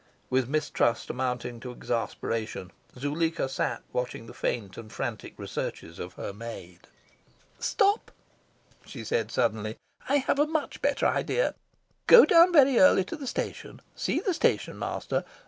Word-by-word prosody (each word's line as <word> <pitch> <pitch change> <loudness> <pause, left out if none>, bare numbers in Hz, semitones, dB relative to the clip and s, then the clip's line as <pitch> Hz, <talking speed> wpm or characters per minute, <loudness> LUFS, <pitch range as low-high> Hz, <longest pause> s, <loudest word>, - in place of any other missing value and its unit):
With 130 -1 +1
mistrust 140 -5 0
mounting 125 -2 -3
to 125 - -7
exasperation 115 -5 -3 0.3
Zuleika 155 +3 -1
sat 135 - -2
watching 125 -2 -3
the 115 - -11
faint 100 -6 -3
and 110 -2 -10
frantic - - -5
researches 85 - -5
of 90 +1 -6
her - - -6
maid. 100 -5 -9 0.7
"Stop!" 405 0 +1 0.7
she - - -9
said 475 0 -1
suddenly. - - -1 0.3
"I 280 - +3
have 280 0 +1
a 295 - +4
much 315 -1 -3
better - - +1
idea. - - +1 0.5
Go 480 -1 +10
down 340 +1 +7
very 275 -6 +6
early 285 -9 +6
to 190 - -6
the 285 -4 -7
station. - - -4 0.2
See - - 0
the 385 - 0
station 335 - 0
master. - - -2
135 Hz, 145 wpm, -28 LUFS, -, 0.7 s, Go